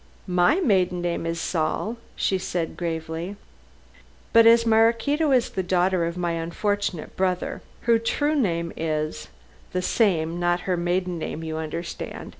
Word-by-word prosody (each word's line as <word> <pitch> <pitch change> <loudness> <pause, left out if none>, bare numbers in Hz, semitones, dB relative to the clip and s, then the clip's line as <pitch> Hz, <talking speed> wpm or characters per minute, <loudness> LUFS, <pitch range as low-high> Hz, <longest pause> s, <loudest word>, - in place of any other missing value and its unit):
"My 180 - +3
maiden 185 - +2
name 170 -1 -1
is 165 0 -2
Saul," 165 +8 -1 0.2
she 190 - 0
said 175 -2 -3
gravely. 165 +2 -4 1.0
"But 230 0 +7
as 230 0 +6
Maraquito 230 +7 +3
is 250 -3 +3
the 190 - -1
daughter 180 -1 +1
of 170 +1 -5
my 175 -1 -1
unfortunate 170 +2 -2
brother, 185 -1 -1 0.2
her 230 -1 +3
true 290 +6 0
name 170 - 0
is 155 -1 -2 0.5
the 180 - 0
same 175 -6 +1
not 175 0 +1
her 185 - 0
maiden 175 0 -1
name, 160 0 -4
you 160 -1 -4
understand. 165 +2 -5
180 Hz, 145 wpm, -24 LUFS, 165-210 Hz, 1.0 s, But